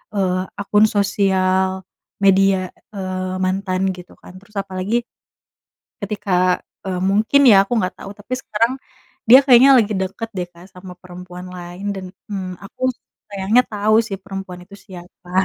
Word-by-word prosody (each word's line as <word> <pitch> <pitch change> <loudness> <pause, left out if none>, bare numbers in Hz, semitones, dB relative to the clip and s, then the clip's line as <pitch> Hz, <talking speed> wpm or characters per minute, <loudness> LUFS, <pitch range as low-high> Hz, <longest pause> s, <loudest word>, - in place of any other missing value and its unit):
eee, 185 -2 0 0.2
akun 205 +1 +3
sosial 190 -2 +1 0.4
media, 195 -1 +3 0.3
eee, 185 -1 -4
mantan 185 0 -1 0.2
gitu 180 - -13
kan - - -14
terus 205 +2 -24
apalagi 195 +5 -2 1.0
ketika 185 -3 0 0.3
e - - -2 0.2
mungkin 220 +8 +3
ya 200 - +8
aku 200 - -10
nggak 185 -3 -1
tau 195 - -9
tapi 205 +5 -12
sekarang 230 +2 0 0.5
dia 255 +3 +10
kayaknya 260 +1 +7
lagi 215 -1 +1
deket 190 +4 -3
deh 175 -1 -3
Kak 170 +2 -15
sama 180 0 -10
perempuan 180 0 -10
lain 175 +3 -8
dan, 190 -1 -7 0.2
mmm, 185 -3 -5
aku 205 +5 -14 0.5
sayangnya 200 +5 +2
tau 215 0 +2
sih 195 - -4
perempuan 195 -2 -7
itu 200 - -14
siapa. 180 -1 -13
190 Hz, 145 wpm, -19 LUFS, 185-205 Hz, 1.0 s, dia